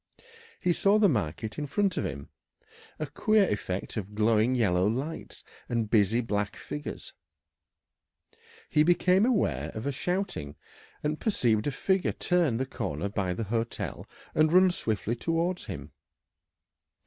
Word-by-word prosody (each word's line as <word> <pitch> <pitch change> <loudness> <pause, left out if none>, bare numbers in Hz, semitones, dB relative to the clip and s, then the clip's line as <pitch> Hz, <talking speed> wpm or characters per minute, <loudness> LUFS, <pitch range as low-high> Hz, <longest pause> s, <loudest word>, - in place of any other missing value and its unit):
He 175 - +2
saw 200 +4 +4
the 215 -1 +5
market 110 - -2
in 145 - -3
front 195 +4 +1
of - - -1
him 70 -1 -7 0.7
a 155 - -2
queer 210 +7 +2
effect 100 0 -3
of 105 0 -5
glowing 110 +3 +3
yellow 95 -6 +2
lights 135 +9 -4 0.3
and 115 -3 -1
busy 110 +2 +3
black 105 -3 -2
figures. 75 -1 -7 1.5
He 150 - +3
became 180 +5 +4
aware 245 -6 +1
of 110 +3 -5
a 140 - 0
shouting, 175 - -3 0.5
and 150 +1 -1
perceived 120 - +1
a - - +1
figure 190 +7 0
turn 170 -10 +1
the 130 - -1
corner 85 - -3
by 95 -3 -1
the 115 - -2
hotel 115 +2 -3 0.3
and 155 0 +3
run 185 +1 +6
swiftly 110 - -2
towards 165 +7 -1
him. - - -7
125 Hz, 140 wpm, -28 LUFS, 105-175 Hz, 1.5 s, run